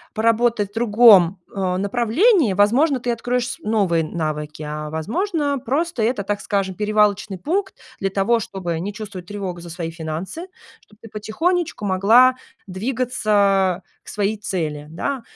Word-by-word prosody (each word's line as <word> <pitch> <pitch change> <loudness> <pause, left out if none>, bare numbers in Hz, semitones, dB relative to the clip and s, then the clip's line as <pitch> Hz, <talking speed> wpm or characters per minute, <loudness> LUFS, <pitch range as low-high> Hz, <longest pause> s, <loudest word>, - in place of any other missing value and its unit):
поработать 230 -2 +1
в - - -30
другом, 210 -5 +5 0.2
э, 185 -2 -1
направлении, 240 - +2
возможно, 250 - +3
ты 245 0 -2
откроешь 245 +1 -1
с - - -6
новые 200 -6 +1
навыки, 155 -2 -4
а 150 0 -5
возможно, 285 - -1
просто 275 +3 -1
это, 220 -1 0
так 205 +1 -2
скажем, 195 -2 -1
перевалочный 210 -1 +1
пункт 380 - -2 0.2
для 195 - 0
того, 200 +5 +1
чтобы 175 -6 -4
не 195 +5 -4
чувствовать 205 -5 -8
тревогу 195 -3 -5
за 170 - -10
свои 165 -1 -5
финансы, 165 - -6 0.3
чтоб 210 - -24
ты 225 - -13
потихонечку 315 - -2
могла 220 +7 +5 0.3
двигаться 200 -4 +1 0.2
к - - -12
своей 210 +1 -1
цели, 155 -7 -4
да. 245 - -3
205 Hz, 145 wpm, -21 LUFS, 185-240 Hz, 0.3 s, другом